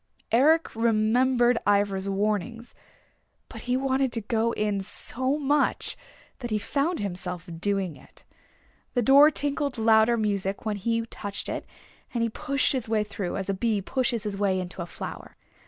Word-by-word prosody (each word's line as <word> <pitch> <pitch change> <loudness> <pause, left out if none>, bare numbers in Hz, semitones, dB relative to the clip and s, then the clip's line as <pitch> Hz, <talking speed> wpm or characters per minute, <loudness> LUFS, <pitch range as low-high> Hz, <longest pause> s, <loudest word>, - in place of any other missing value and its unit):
Eric 305 +7 +3
remembered 235 +2 +3
Ivra's 200 -1 +1
warnings, 215 +4 -2 0.8
but - - -9
he 250 +1 0
wanted 265 -1 0
to 230 - 0
go 225 +2 0
in 210 -2 -1
so 260 +7 +1
much 290 0 +1 0.4
that 240 -2 -5
he 215 - 0
found 290 - -1
himself 180 -3 -5
doing 195 -3 -1
it. - - -12 0.7
The 245 - +2
door 280 +5 +7
tinkled 285 -2 -2
louder 220 +1 +4
music 200 -2 -2
when 215 -2 -1
he 230 +3 -1
touched 205 -3 -6
it, - - -5 0.5
and 235 - +1
he 230 - +1
pushed 280 +4 0
his 250 -5 -3
way 220 -1 +2
through, 205 -3 -4
as 195 - -4
a 195 - 0
bee 215 +1 0
pushes 240 +1 -1
his 205 -2 -4
way 195 -2 +1
into 180 0 -6
a 170 - -5
flower. - - -8
225 Hz, 160 wpm, -26 LUFS, 200-255 Hz, 0.8 s, door